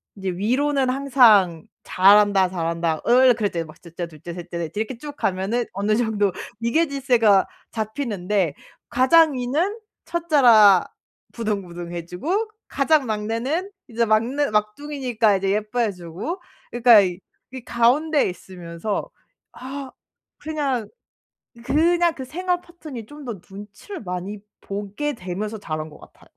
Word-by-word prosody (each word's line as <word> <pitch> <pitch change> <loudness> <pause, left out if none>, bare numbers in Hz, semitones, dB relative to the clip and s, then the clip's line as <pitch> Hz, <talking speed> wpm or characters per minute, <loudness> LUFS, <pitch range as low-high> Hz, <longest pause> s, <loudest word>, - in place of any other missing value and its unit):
이제 195 -1 -4
위로는 260 +8 0
항상 235 - +4 0.2
"잘한다, 200 0 +5
잘한다 165 -2 -2
응 250 +1 +6
그렇지." 205 -7 -2
막 155 - -15
1 170 -2 -14
째 175 - -3
2 155 -3 -16
째 170 - -7
3 175 0 -9
째 170 - -5
4 165 -2 -4
째 215 - -2
이렇게 230 +2 -5
쭉 290 +3 -9
가면은 200 +6 -1
어느 205 +2 0
정도 215 -4 +1 0.3
위계질서가 245 - +3 0.3
잡히는데 210 - -2 0.3
가장 285 +6 +5
위는 300 - -1 0.3
1 340 0 -4
째라 220 - +6 0.5
부등부등 180 -6 -4
해 170 -1 -5
주고 355 - -2 0.2
가장 285 0 +2
막내는 230 - -2 0.2
이제 235 -1 0
막내 235 +7 +1
막둥이니까 225 -1 0
이제 195 0 -1
예뻐해 215 +2 0
주고 185 - -6 0.3
그러니까 235 -3 +7 0.5
이 260 -1 -7
가운데 275 +6 +2
있으면서 180 +2 -5 0.4
아 265 +1 -7 0.5
그냥, 285 -7 -2 0.8
그냥 340 +4 +3
그 260 - -7
생활 360 +5 -2
패턴이 310 -10 -10
좀 295 +3 -11
더 230 -6 -6
눈치를 210 - -10
많이 185 +2 -5 0.2
보게 205 +9 -4
되면서 210 +1 -5
자란 155 -4 -5
것 - - -15
같아요. - - -18
225 Hz, 265 characters per minute, -22 LUFS, 195-275 Hz, 0.8 s, 그러니까